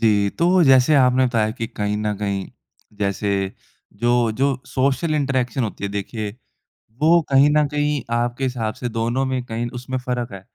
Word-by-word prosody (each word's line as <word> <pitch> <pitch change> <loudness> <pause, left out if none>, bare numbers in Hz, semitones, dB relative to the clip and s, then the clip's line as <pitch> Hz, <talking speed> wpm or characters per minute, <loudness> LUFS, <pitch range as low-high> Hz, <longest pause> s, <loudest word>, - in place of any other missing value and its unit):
जी। 100 -3 +3
तो 175 +1 +4
जैसे 135 +1 +5
आपने 130 -1 +4
बताया 115 -3 +1
कि 115 0 -4
कहीं 105 -3 -3
न 105 0 -1
कहीं 100 -1 -2 0.5
जैसे 100 0 -1 0.7
जो 120 -1 +3
जो 135 +4 +1
सोशल 140 +4 0
इंटरेक्शन 130 -4 0
होती 105 -2 -5
है 100 - -2
देखिए 105 +1 -4 0.7
वो 170 +2 +6
कहीं 135 +2 +5
न 150 - +4
कहीं 150 0 0 0.2
आपके 120 +2 -1
हिसाब 120 -4 -2
से 125 -1 -4
दोनों 120 +3 -1
में 130 -1 -1
कहीं 120 0 -3
उसमें 130 +1 -4
फ़र्क 125 -2 -3
है। 95 - -7
125 Hz, 170 wpm, -21 LUFS, 110-135 Hz, 0.7 s, वो